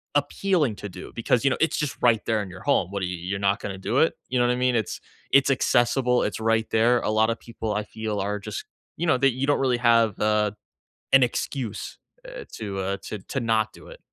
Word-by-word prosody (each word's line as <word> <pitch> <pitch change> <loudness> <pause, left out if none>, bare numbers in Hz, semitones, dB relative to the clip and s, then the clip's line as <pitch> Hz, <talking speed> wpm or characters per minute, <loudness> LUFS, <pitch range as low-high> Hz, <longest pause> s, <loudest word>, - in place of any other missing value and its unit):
appealing 145 - +1
to 100 - -7
do 90 0 -10
because, 115 +1 +1
you 140 - +4
know, - - 0
it's 160 - +2
just 150 -3 -2
right 115 -3 +3
there 110 -2 +1
in 95 - -6
your 95 +1 -11
home. 95 -2 +2
W - - -15
what 100 -1 -3
are - - +1
y - - -3
you 90 - -4
you're 95 +3 -3
not 100 0 +1
gonna 95 -1 -5
do 115 +7 0
it, 160 - +3
you 125 - 0
know 120 - +3
what - - +2
I - - +1
mean? 125 0 +1
It's 110 -5 -1 0.3
it's 140 0 +5
accessible 125 -1 +2
it's - - -2
right 115 0 +1
there, 120 +2 +3
a - - -1
lotta 110 +1 +2
people 115 -2 -5
I 105 - -1
feel 110 -1 -4
are 105 +1 -2
just, 100 - -6 0.3
you 170 - -2
know 155 -6 +3
that 135 -1 +3
you 130 +3 -1
don't 145 0 +2
really 130 -2 +2
have, 115 -3 +3
uh, 105 -1 +2 0.6
an 135 -1 +7
excuse, 120 -2 -3 0.3
uh, - - -8
to, 100 -3 -5
uh, 100 +1 -2
to 105 - -5
to 135 - -4
not 110 -2 +1
do - - -14
it. - - -12
115 Hz, 250 wpm, -25 LUFS, 105-130 Hz, 0.6 s, an